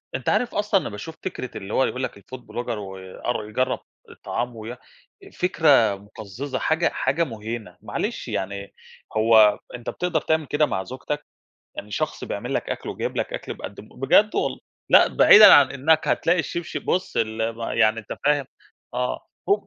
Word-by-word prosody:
أنت - - -2
عارف 245 - 0
أصلًا 205 -2 +2
أنا - - -5
باشوف 135 +11 -8
فكرة 130 -9 -5
اللي 95 +2 -7
هو 130 - +3
يقول 130 +1 -3
لك 100 - -5
الFood 130 +6 -10
Blogger 120 -2 -5
ويأر 95 +3 -5
يجرّب 130 +4 0 0.3
الطعام 120 -1 -4
ويا 115 +3 -7 0.6
فكرة 145 - +3
مُقزّزة، 105 +6 -7
حاجة 160 +2 +1
حاجة 135 +6 0
مُهيْنة. 110 - -6
معلش - - -4
يعني 100 +1 -4 0.4
هو 110 -2 +6 0.2
أنت 120 - -6
بتقدر 180 0 -1
تعمل 160 -1 0
كده 150 +2 +2
مع 95 -8 -2
زوجتك؟ 145 +3 -5 0.5
يعني 105 - -7
شخص - - -3
بيعمل - - -4
لك - - -2
أكْل - - -4
وجايب - - -4
لك - - -2
أكل - - -5
بيقدِّم 100 +2 -9
بجد 170 +11 +3
وال - - -1 0.3
لأ، - - +7
بعيدًا 210 +1 +9
عن 140 -2 +6
إنّك 155 +4 +2
هتلاقي 175 +2 +2
الشِبْشِب 170 +1 -4
بُص 185 - -1
ال 110 0 0
ما 115 - -4
يعني 110 +1 +3
أنت 105 - -8
فاهم، 145 -2 +2 0.5
آه 125 0 -1 0.3
هوب 205 0 +2
125 Hz, 170 wpm, -23 LUFS, 110-155 Hz, 0.6 s, بعيدًا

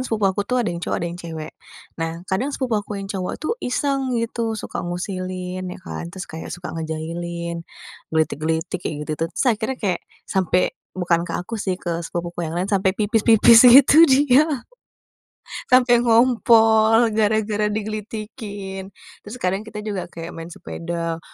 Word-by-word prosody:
sepupu 215 -3 0
aku 195 +1 +1
tuh 250 - +1
ada - - -1
yang 170 - -5
cowok - - -2
ada - - -3
yang 175 - -9
cewek. 160 -2 -7 0.5
Nah, 165 +2 -4
kadang 190 +9 -1
sepupu 250 -7 -1
aku 205 0 -7
yang 195 - -5
cowok 185 -2 -3
tuh 310 - -2
iseng 270 +1 -1
gitu 230 -1 -2
suka - - -5
ngusilin 185 +1 -4
ya 180 - -7
kan 170 - -6
terus 185 +1 -7
kayak 160 0 -8
suka 175 0 -7
ngejailin, 170 +1 -4 0.5
gelitik-gelitik, 160 +2 -1
kayak 155 - -4
gitu 155 - -3
tuh 165 - 0
terus - - +1
akhirnya 220 +4 -3
kayak 190 -7 -1 0.2
sampai 185 -1 +1 0.2
bukan 175 -1 0
ke - - -5
aku 220 +5 -4
sih 190 -2 -1
ke 180 -1 -5 0.2
sepupuku 175 0 -4
yang 160 - -5
lain 180 +3 -2
sampai 190 -1 +2
pipis-pipis 225 +2 +6
gitu 280 +6 +8
dia, 275 +1 +5 1.2
sampai 250 -1 +5
ngompol 225 -1 +4
gara-gara 215 0 +1
digelitikin, 210 -2 -5 0.3
terus 210 +3 -10
kadang 195 -1 -2
kita 210 -1 -7
juga 200 -5 -4
kayak 170 0 -8
main 165 0 -8
sepeda, 170 -1 -5
195 Hz, 160 wpm, -22 LUFS, 175-225 Hz, 1.2 s, gitu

